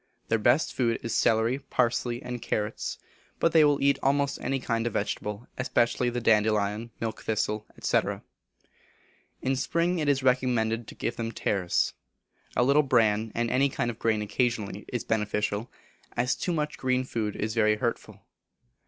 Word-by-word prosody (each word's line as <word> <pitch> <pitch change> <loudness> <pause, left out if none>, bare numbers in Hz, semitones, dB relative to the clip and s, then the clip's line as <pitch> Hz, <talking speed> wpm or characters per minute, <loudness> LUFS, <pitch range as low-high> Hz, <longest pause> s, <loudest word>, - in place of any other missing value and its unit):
Their 115 - +2
best 120 +8 +3
food 115 -3 +1
is 115 - -2
celery, 115 +4 +2
parsley, 120 -2 0
and 125 -1 -5
carrots; 105 0 -2 0.4
but 165 - +3
they 160 -1 +6
will 145 -1 +4
eat 140 0 +3
almost 140 +1 +1
any 135 0 -1
kind 115 -2 -1
of 115 - -3
vegetable, 105 +2 -3
especially 125 -2 +1
the 120 0 -2
dandelion, 105 0 +2
milk 115 -1 -4
thistle, 105 0 -1
&c. - - +3 1.4
In 135 +1 +1
spring 170 +6 0
it 150 -2 +1
is 135 -2 +2
recommended 120 -3 +1
to - - -10
give 120 - -3
them 115 -1 -3
tares. 95 -5 0 0.6
A - - +4
little 140 +4 +5
bran, 110 -5 +2
and 120 0 0
any 140 +2 +3
kind 120 -2 -1
of 115 - -13
grain 110 -2 +1
occasionally 105 -2 -1
is 120 - -2
beneficial, 105 0 -1 0.5
as 125 +2 +2
too 180 - -2
much 150 -2 -2
green 130 0 +1
food 110 -5 -3
is 110 +1 -2
very 110 -2 +3
hurtful. 115 +2 -4
120 Hz, 160 wpm, -27 LUFS, 110-130 Hz, 1.4 s, they